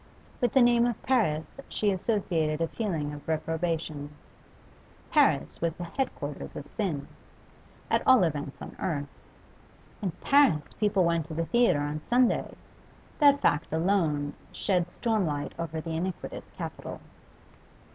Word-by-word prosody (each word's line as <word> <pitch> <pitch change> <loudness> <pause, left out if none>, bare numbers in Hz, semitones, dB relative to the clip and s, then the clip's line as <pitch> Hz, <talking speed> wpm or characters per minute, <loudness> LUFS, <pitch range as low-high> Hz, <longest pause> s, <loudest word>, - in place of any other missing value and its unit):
With 245 - +2
the 265 - +6
name 240 0 +5
of 240 - -2
Paris 180 -12 +2 0.2
she 210 -1 +1
associated 175 -6 0
a 165 - +1
feeling 160 -9 -2
of 145 - -10
reprobation; 160 -2 -2 1.0
Paris - - +3
was 165 -1 +1
the 175 - -7
head 250 +10 -2
quarters 145 0 -6
of 145 - -6
sin 160 -6 -3 0.8
at - - +2
all 260 -6 +7
events 145 -4 -2
on - - -9
earth. 145 -5 -1 1.0
In 195 - 0
Paris 275 - +3
people 200 -3 +2
went 170 -2 +1
to 160 - -6
the 165 +1 0
theatre 235 -8 +3
on 145 +1 -3
Sunday; 245 0 +2 0.6
that 285 -2 +6
fact 150 +1 +2
alone 160 -4 +1 0.2
shed 180 -3 0
storm 220 -3 0
light 145 -1 -3
over 165 -1 -3
the 165 +1 -5
iniquitous 180 +2 -4
capital. - - -6
170 Hz, 140 wpm, -28 LUFS, 155-215 Hz, 1.0 s, all